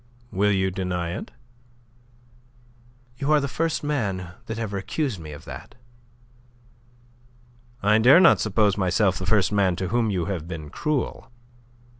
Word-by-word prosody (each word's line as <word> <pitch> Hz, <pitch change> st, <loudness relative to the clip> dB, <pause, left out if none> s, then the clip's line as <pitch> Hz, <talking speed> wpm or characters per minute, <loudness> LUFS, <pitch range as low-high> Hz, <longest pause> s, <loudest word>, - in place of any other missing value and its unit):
"Will 105 Hz, +2 st, +2 dB
you 95 Hz, -1 st, +1 dB
deny 90 Hz, -2 st, -3 dB
it?" -, -, -6 dB, 1.9 s
"You 140 Hz, +2 st, 0 dB
are 155 Hz, -, +5 dB
the 140 Hz, -, -2 dB
first 165 Hz, +4 st, -1 dB
man 100 Hz, -, -2 dB, 0.2 s
that 110 Hz, -, -4 dB
ever 105 Hz, -3 st, -3 dB
accused 120 Hz, -, -2 dB
me 75 Hz, -2 st, -9 dB
of 75 Hz, -, -11 dB
that." -, -, -10 dB, 2.1 s
"I 105 Hz, +2 st, +4 dB
dare 130 Hz, +9 st, +7 dB
not 185 Hz, -, +6 dB
suppose 105 Hz, -1 st, +2 dB
myself 95 Hz, 0 st, +2 dB
the 95 Hz, -, -5 dB
first 100 Hz, -1 st, +3 dB
man 100 Hz, -3 st, +2 dB
to 95 Hz, +1 st, -3 dB
whom 115 Hz, +1 st, +1 dB
you 90 Hz, -4 st, -1 dB
have 85 Hz, -4 st, -4 dB
been 80 Hz, -4 st, -7 dB
cruel. 150 Hz, -3 st, -2 dB
100 Hz, 145 wpm, -24 LUFS, 90-115 Hz, 2.1 s, dare